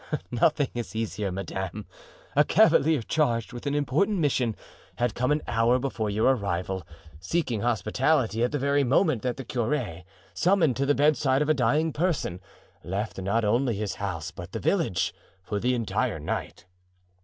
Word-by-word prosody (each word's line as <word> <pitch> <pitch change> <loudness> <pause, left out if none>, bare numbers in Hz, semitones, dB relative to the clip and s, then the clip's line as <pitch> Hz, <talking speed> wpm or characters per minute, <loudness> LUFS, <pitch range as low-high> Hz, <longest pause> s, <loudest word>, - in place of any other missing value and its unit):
"Nothing 145 +3 +2
is 120 -2 -5
easier, 105 -3 -2
madame. 95 +2 -5 0.5
A - - +6
cavalier, 155 -4 +4
charged 120 -5 0
with 120 +3 -6
an 140 - 0
important 150 - +1
mission, 130 - +1 0.4
had 120 -2 0
come 125 +3 0
an 150 +1 +1
hour 115 +2 +3
before 125 -5 -2
your 110 +6 +3
arrival, 95 -3 -2 0.4
seeking 120 - -1
hospitality, 120 +2 +1
at 125 - +1
the 145 - 0
very 140 +1 +2
moment 135 - +2
that 125 -1 -2
the 135 - -6
curé, 115 - -2 0.3
summoned 175 -8 +3
to 140 +1 0
the 145 - +3
bedside 145 -1 +3
of 150 - -3
a - - +6
dying 155 +3 +1
person, 155 - -1 0.4
left 95 +3 -3
not 105 +4 0
only 120 +2 +2
his 105 -2 -3
house 85 -6 -3
but - - -10
the - - -3
village, - - 0 0.3
for 100 +1 -3
the 125 +4 +1
entire 115 -3 -1
night. - - -4
120 Hz, 165 wpm, -26 LUFS, 105-145 Hz, 0.5 s, A